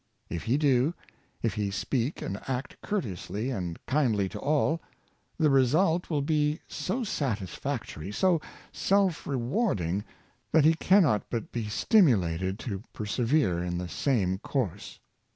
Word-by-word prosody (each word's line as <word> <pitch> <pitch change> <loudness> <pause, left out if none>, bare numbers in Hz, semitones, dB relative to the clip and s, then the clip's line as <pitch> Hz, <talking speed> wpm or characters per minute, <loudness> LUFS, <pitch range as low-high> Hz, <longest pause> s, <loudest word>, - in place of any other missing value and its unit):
If 85 0 -4
he 120 +5 +2
do 145 +2 +3 0.2
— - - -35
if 115 - +1
he 105 -2 -1
speak 115 - -2
and 100 - -4
act 130 +1 -3
courteously 115 - -3
and 90 -8 -3
kindly 120 -8 +2
to - - -7
all 155 +3 +1 0.3
— - - -41
the 155 -3 +3
result 160 +7 +3
will 150 -4 0
be 150 +1 +1
so 235 +7 -2
satisfactory, 100 - -3
so 175 - +2 0.3
self 195 -4 +1
rewarding, 120 - 0 0.5
that 155 -2 +6
he 160 - +7
cannot 165 - +3
but 115 -3 -3
be 115 -3 -3
stimulated 95 - +3
to 100 -5 -4
per 105 - -5
severe 115 - +1
in 90 0 -2
the 90 0 -3
same 95 -5 0
course. 125 - -3
125 Hz, 145 wpm, -28 LUFS, 100-155 Hz, 0.5 s, he